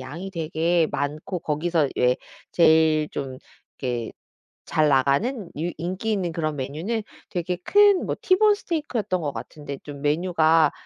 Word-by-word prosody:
양이 165 +9 -7
되게 165 0 +1
많고 150 +6 -3
거기서 155 0 0
왜 125 0 +3 0.4
제일 160 -2 +4
좀 130 -2 -5 0.4
이렇게 120 -4 -3 0.5
잘나가는 155 - +2
유 170 +2 -1
인기 185 +7 -3
있는 180 -5 -1
그런 155 -2 -2
메뉴는 160 - -3 0.3
되게 175 -1 -2
큰 410 -2 +5
뭐 - - -2
티본스테이크였던 340 - +1
것 145 -2 -3
같은데 145 -2 -7
좀 145 -2 -9
메뉴가 160 0 +3
160 Hz, 275 characters per minute, -24 LUFS, 145-185 Hz, 0.5 s, 큰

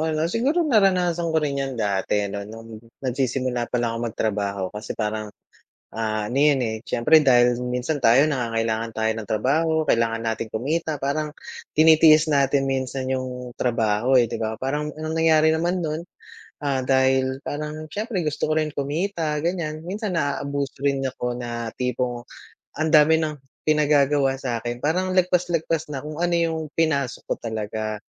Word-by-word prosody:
'no. 155 - 0
Siguro, 285 - +1
naranasan 185 - +2
ko - - +3
rin 140 -2 -1
'yan 135 -1 -2
dati 105 -1 0
ano, 100 0 -4
nung 115 0 -10 0.2
nagsisimula 125 -1 -1
palang 115 -2 -1
akong 120 - -2
magtrabaho. 100 -3 -2
Kasi 105 +1 -6
parang, 110 -1 -2 0.6
ah, 110 -1 -2
ano 130 - -1
yun, 145 -2 +4
eh, 110 -2 -1
siyempre 120 +7 +4
dahil 125 -4 +4
minsan 125 +5 -2
tayo 135 +4 +5
nangangailangan 115 -3 -1
tayo 110 0 0
ng 110 - -6
trabaho, 155 - +1
kailangan 115 -5 +1
nating 115 -1 -3
kumita, 155 +7 -1
parang 150 +2 -1 0.4
tinitiis 155 0 +6
natin 140 -1 +2
minsan 130 0 -2
yung 125 -1 -4
trabaho, 115 +1 +1
eh, 120 -3 +4
'di - - -3
ba? 110 0 -2
Parang 150 +3 -2
ang 155 +1 -5
nangyari 160 -1 +4
naman 175 +3 0
no'n, 160 +1 -3 0.6
ah, 140 -2 0
dahil 130 0 +2
parang 150 +1 -5
siyempre 210 -1 -2
gusto 150 -1 -1
ko 155 - 0
rin 155 -1 0
kumita 150 +1 -2
ganiyan, 165 -3 -2
minsan 195 +2 -3
naaabuso 140 -3 -2
rin 140 -1 0
ako 125 -2 -3
na 120 -1 -4
tipong 125 -1 -2 0.5
ang 160 +1 0
dami 155 +1 +6
ng 155 -1 -1 0.3
pinagagawa 145 -3 +3
sa'kin. 120 -2 -3
Parang 185 +4 +1
lagpas-lagpas 170 -3 +1
na 135 -1 -5
kung 150 0 -6
ano 175 0 +1
yung 165 -1 0 0.2
pinasok 140 -5 0
ko - - +1
talaga. 110 -1 -4
135 Hz, 155 wpm, -23 LUFS, 120-155 Hz, 0.6 s, tinitiis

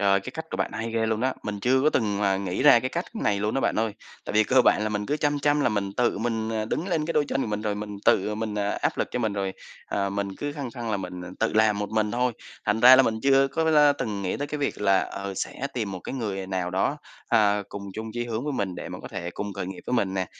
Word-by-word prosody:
Trời, 100 -1 +4
cái 115 - -7
cách 160 +5 -6
của - - -3
bạn - - -1
hay 115 +1 -3
ghê 115 -1 +1
luôn 110 0 0
đó! 130 +2 +1
Mình 105 -1 -4
chưa 130 +4 +3
có 155 - +4
từng 105 -7 0
mà 100 -2 +2
nghĩ 95 +2 -2
ra 140 -5 +8
cái 130 - -2
cách 170 +6 -3
này 105 - 0
luôn 105 +1 -1
đó 135 - +1
bạn - - 0
ơi, 110 -2 0 0.3
tại - - -5
vì 110 +1 +4
cơ 130 +2 +4
bản 105 - +4
là 110 - 0
mình 105 -1 -2
cứ 145 - 0
chăm 145 -1 0
chăm 145 +1 +2
là - - +3
mình 100 -2 -1
tự 120 -4 +1
mình, 115 0 -1
à, 110 -1 -1
đứng 160 - -2
lên 160 -4 0
cái 165 - -1
đôi 150 -2 +3
chân 135 - 0
của - - -2
mình 105 0 -2
rồi 105 -1 -1
mình 105 0 -6
tự 105 +3 +3
mình, 110 -1 -3
à, 100 -1 0
áp - - -1
lực - - 0
cho - - -2
mình 110 -4 0
rồi, 100 -1 -2 0.3
ờ, 100 -1 -1
mình 100 0 -2
cứ 145 0 -3
khăng 140 -4 -5
khăng 120 -2 -5
là 105 - +1
mình, 90 -2 -6
à, - - -8
tự - - +1
làm 110 -1 +3
một 105 0 -3
mình 110 -1 +1
thôi, 125 0 +1 0.3
thành 105 +1 +1
ra 125 +2 +10
là 135 - +7
mình 110 -3 -1
chưa 135 0 +4
có 160 +4 -1
la 150 -2 +5
từng 105 -3 -3
nghĩ 95 - -1
tới 145 - -3
cái 150 +1 -4
việc 140 - -2
là, 100 -2 +4
ờ, 100 0 -5
sẽ 135 - -3
tìm 110 -6 -2
một 95 - -6
cái - - -6
người 100 -7 -3
nào 95 -2 -2
đó, 95 +10 0 0.3
ờ, 105 -4 +3
cùng 100 - -7
chung 110 +1 -5
chí 120 +1 -2
hướng 115 +2 -3
với 150 - -2
mình 100 -8 -2
để - - -6
mà - - -7
có - - -7
thể 85 - -5
cùng 105 0 -4
khởi 90 - -4
nghiệp 95 0 -7
với 125 - 0
mình 100 -5 +1
nè, 95 -1 -1
110 Hz, 310 wpm, -26 LUFS, 100-130 Hz, 0.3 s, ra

